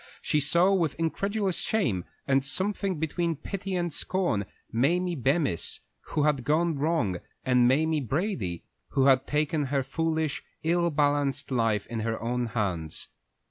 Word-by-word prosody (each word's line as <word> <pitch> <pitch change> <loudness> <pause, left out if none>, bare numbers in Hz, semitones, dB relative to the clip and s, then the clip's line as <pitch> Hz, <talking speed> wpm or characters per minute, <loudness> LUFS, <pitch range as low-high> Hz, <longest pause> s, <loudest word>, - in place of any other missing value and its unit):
She 150 - +2
saw 170 +7 +4
with 170 -7 +1
incredulous 195 +3 -1
shame, 120 - 0 0.2
and 135 -1 +3
something 190 +4 -1
between 165 +2 -1
pity 195 +5 -4
and 175 -3 -1
scorn, 170 - -1 0.2
Mamie 175 +9 +2
Bemis, 140 - +1 0.3
who 150 - -1
had 145 -4 +2
gone 160 +5 +2
wrong, 145 - +1 0.3
and 125 -2 +4
Mamie 155 +4 +2
Brady, 130 - -2 0.3
who 135 - +3
had 135 -1 +4
taken 150 0 +1
her 135 0 0
foolish, 160 0 -1 0.2
ill 170 +1 +2
balanced 145 -2 +1
life 115 -5 +1
in 115 -1 -4
her 115 +1 -2
own 120 +1 -1
hands. 95 -9 -2
150 Hz, 140 wpm, -28 LUFS, 125-170 Hz, 0.3 s, saw